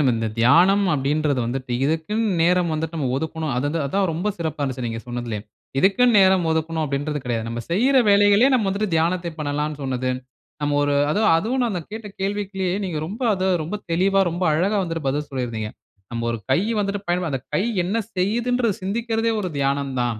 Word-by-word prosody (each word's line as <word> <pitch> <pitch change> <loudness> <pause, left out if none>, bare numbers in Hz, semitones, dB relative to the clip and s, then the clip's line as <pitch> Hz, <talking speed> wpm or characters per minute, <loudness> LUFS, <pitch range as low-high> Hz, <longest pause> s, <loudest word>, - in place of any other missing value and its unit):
நம்ம 130 -4 +3
இந்த 115 0 -1
தியானம் 175 - +5
அப்டீன்றது 145 -1 +1
வந்துட்டு 130 +1 -4
இதுக்குனு 160 +9 0 0.2
நேரம் 175 0 +3
வந்துட்டு 160 +1 -3
நம்ம 140 -5 -1
ஒதுக்கணும். 160 0 -3
அதுத 145 +5 -1
அதான் 195 +7 +1
ரொம்ப 175 +6 -2
சிறப்பா 160 -3 -3
இருந்துச்சு 130 -3 -2
நீங்க 115 0 -4
சொன்னதிலயே. 120 -3 -4 0.4
இதுக்குனு 235 - +4
நேரம் 190 -2 +4
ஒதுக்கணும் 160 0 0
அப்டீன்றது 145 +1 -2
கிடையாது. 115 -2 -2
நம்ம 115 +1 -4
செய்யிற 250 +10 +3
வேலைகளிலே 205 +4 +5
நாம 225 -5 +2
வந்துட்டு 200 +2 -1
தியானத்த 170 +1 0
பண்ணலானு 150 0 -2
சொன்னது. 130 -1 -1 0.5
நம்ம 145 0 0
ஒரு 145 0 +1 0.2
அது 205 - +1 0.2
அதுவும் 230 +10 0
நான் 235 - 0
அந்த 175 - -3
கேட்ட 220 0 -6
கேள்விக்குலே 195 -1 -2 0.2
நீங்க 175 -5 -3
ரொம்ப 210 +9 -6
அத 185 - -4 0.2
ரொம்ப 170 +7 -4
தெளிவா 195 +4 +3
ரொம்ப 175 +2 -2
அழகா 185 +7 +1
வந்துட்டு 165 -4 -4
பதில் 145 +2 -1
சொல்லி 130 -2 -2
இருந்தீங்க. 110 -2 -4 0.4
நம்ப 115 -1 -3
ஒரு 115 - -2
கை 135 - +4 0.2
வந்துட்டு 200 0 -2
பயன்ப 175 0 0
அந்த 135 -2 -2
கை 185 - +2 0.2
என்ன 195 +5 -1 0.2
செய்துன்றது 230 +3 +1
சிந்திக்கிறதே 225 +3 -1
ஒரு 185 -3 -3
தியானம் 140 0 0
தான். 120 -3 -1
165 Hz, 185 wpm, -22 LUFS, 140-195 Hz, 0.5 s, தியானம்